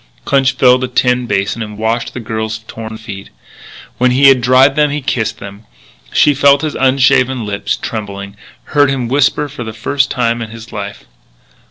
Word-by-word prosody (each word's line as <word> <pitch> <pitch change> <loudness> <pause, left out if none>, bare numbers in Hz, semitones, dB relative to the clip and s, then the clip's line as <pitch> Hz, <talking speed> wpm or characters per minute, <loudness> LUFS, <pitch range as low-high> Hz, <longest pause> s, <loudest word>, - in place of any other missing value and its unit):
Clinch 135 -1 +2
filled 125 0 +4
a - - -1
tin 125 0 +1
basin 100 +2 -1
and 105 -1 -6
washed 115 +2 -2
the - - -4
girl's 110 -1 -4
torn 110 0 -8
feet. 100 -3 -9 0.7
When 125 +1 +3
he 135 +2 +5
had 130 -2 +4
dried 130 +3 +4
them 150 -1 +3
he 145 +1 -2
kissed 125 -5 -2
them. 100 +2 -11 0.4
She 150 - +4
felt 140 +1 +4
his 155 - -2
unshaven 130 -2 +2
lips 100 0 -2
trembling, 100 -2 -6 0.4
heard 145 -2 +4
him 130 -3 -2
whimper 140 +3 +1
for 140 -3 -8
the 110 -1 -7
first 135 +5 -1
time 120 -1 -1
in 115 - -5
his 115 +1 -11
life. 100 -1 -7
125 Hz, 180 wpm, -14 LUFS, 110-135 Hz, 0.7 s, he